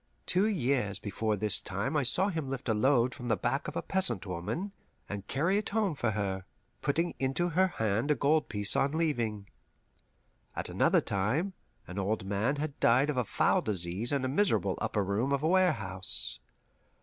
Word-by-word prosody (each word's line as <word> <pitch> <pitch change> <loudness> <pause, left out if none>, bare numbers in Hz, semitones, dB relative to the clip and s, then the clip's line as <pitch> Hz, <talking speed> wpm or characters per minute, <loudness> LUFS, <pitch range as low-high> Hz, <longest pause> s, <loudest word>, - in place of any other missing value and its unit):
Two 190 +4 +3
years 130 - 0
before 105 +2 -2
this 105 0 +5
time 100 +10 -3
I 150 - +3
saw 180 +10 +2
him 160 -7 -3
lift 135 -1 -5
a 110 - +2
load 125 +2 +3
from 125 - -7
the 115 -3 +2
back 135 +9 -1
of 150 - -6
a - - -2
peasant 125 - -1
woman 95 - -4 0.4
and 100 -1 -6
carry 170 +9 +1
it 210 - -4
home 210 -4 +1
for 120 -5 -1
her, 95 -3 -2 0.4
putting 165 +4 0
into 135 +7 0
her 185 +3 +3
hand 110 - -1
a 150 - +4
gold 150 +2 +2
piece 105 -1 +1
on 140 +2 +2
leaving. 120 -11 -1 1.1
At - - -4
another - - +3
time, 120 - 0 0.3
an 90 +2 -6
old 100 +1 -1
man 105 +8 0
had 145 0 -4
died 130 +5 +4
of 135 - -5
a 125 - +2
foul - - +2
disease 95 +2 -1
in 140 -2 0
a - - +1
miserable 130 - +2
upper 105 - 0
room 105 +8 -1
of 140 +1 0
a - - +3
warehouse. 120 - 0
125 Hz, 185 wpm, -30 LUFS, 105-155 Hz, 1.1 s, this